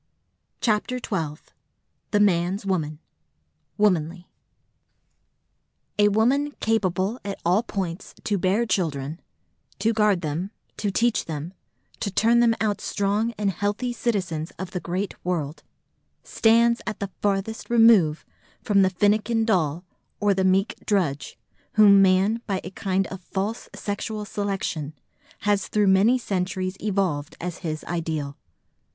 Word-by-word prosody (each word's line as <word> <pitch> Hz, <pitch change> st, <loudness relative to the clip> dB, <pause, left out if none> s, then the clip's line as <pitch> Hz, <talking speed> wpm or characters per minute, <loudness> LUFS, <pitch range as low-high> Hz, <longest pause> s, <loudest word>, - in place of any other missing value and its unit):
CHAPTER 225 Hz, +2 st, +1 dB
XII 160 Hz, -11 st, -3 dB, 0.7 s
THE 210 Hz, -, +2 dB
MAN'S 190 Hz, 0 st, +2 dB
WOMAN: 160 Hz, -6 st, -1 dB, 0.8 s
WOMANLY 180 Hz, -4 st, +1 dB, 1.7 s
"A 205 Hz, -, +6 dB
woman 255 Hz, +8 st, +2 dB
capable 205 Hz, 0 st, 0 dB
at 200 Hz, -1 st, -5 dB
all 180 Hz, +5 st, +4 dB
points 190 Hz, -5 st, -5 dB
to 205 Hz, -2 st, 0 dB
bear 195 Hz, +6 st, +2 dB
children, 155 Hz, -7 st, -1 dB, 0.6 s
to 225 Hz, +1 st, +1 dB
guard 210 Hz, -4 st, +3 dB
them, 160 Hz, +4 st, -3 dB, 0.3 s
to 210 Hz, -, -1 dB
teach 230 Hz, +4 st, +1 dB
them, 160 Hz, +2 st, -5 dB, 0.5 s
to 205 Hz, -, -2 dB
turn 230 Hz, +4 st, +3 dB
them 235 Hz, -1 st, +4 dB
out 210 Hz, -2 st, 0 dB
strong 205 Hz, +3 st, 0 dB
and 200 Hz, -1 st, +1 dB
healthy 205 Hz, +6 st, -2 dB
citizens 185 Hz, -10 st, -2 dB
of 185 Hz, 0 st, -6 dB
the 180 Hz, -, -3 dB
great 185 Hz, +3 st, -3 dB
world, 165 Hz, -4 st, -2 dB, 0.6 s
stands 235 Hz, +1 st, +3 dB
at 210 Hz, -, -3 dB
the 200 Hz, -1 st, -4 dB
farthest 205 Hz, +2 st, -1 dB
remove 225 Hz, -10 st, +5 dB, 0.4 s
from 200 Hz, -2 st, +3 dB
the 190 Hz, -, +4 dB
finnikin 210 Hz, +4 st, +2 dB
doll 175 Hz, -5 st, 0 dB, 0.3 s
or 205 Hz, -1 st, +3 dB
the 190 Hz, 0 st, 0 dB
meek 190 Hz, +2 st, +2 dB
drudge 170 Hz, -9 st, -1 dB, 0.4 s
whom 200 Hz, -2 st, +7 dB
man 195 Hz, +4 st, +3 dB
by 195 Hz, -3 st, 0 dB
a 185 Hz, -, -7 dB
kind 190 Hz, 0 st, -1 dB
of 190 Hz, 0 st, -7 dB
false 200 Hz, +5 st, -4 dB
sexual 210 Hz, +1 st, -4 dB
selection 195 Hz, -8 st, -3 dB, 0.5 s
has 205 Hz, -1 st, +1 dB
through 210 Hz, -1 st, +2 dB
many 205 Hz, +7 st, +5 dB
centuries 185 Hz, -4 st, -2 dB
evolved 185 Hz, -8 st, -1 dB
as 175 Hz, -1 st, -5 dB
his 155 Hz, -3 st, -4 dB
ideal." 160 Hz, -4 st, -3 dB
195 Hz, 130 wpm, -24 LUFS, 175-215 Hz, 1.7 s, whom